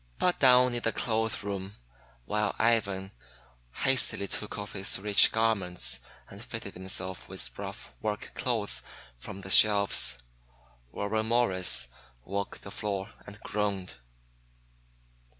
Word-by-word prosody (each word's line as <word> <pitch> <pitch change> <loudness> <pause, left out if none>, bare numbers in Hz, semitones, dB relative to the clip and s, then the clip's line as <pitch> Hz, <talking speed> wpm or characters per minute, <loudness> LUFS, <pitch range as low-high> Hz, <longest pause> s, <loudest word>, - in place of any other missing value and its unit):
But 180 - +1
down 125 -1 +5
in 120 - -2
the 115 - 0
clothes 110 -1 -2
room 100 -1 -5 0.5
while 105 - -1
Ivan 100 -4 +1 0.7
hastily 130 -6 +3
took 105 - -4
off 100 0 -6
his 95 -1 +3
rich 100 +1 +5
garments 105 -6 0 0.3
and - - -11
fitted - - -7
himself 95 0 -4
with - - -2
rough - - -7
work 105 -1 -3
clothes 115 -5 -2 0.4
from 95 +10 -8
the 95 0 -6
shelves, 100 - +6 0.7
Warren 110 +2 -2
Morris 95 - +2 0.4
walked 100 +5 -5
the 100 - -8
floor 100 -1 -4 0.2
and 100 +1 -10
groaned. 100 -8 -3
100 Hz, 120 wpm, -29 LUFS, 95-110 Hz, 0.7 s, shelves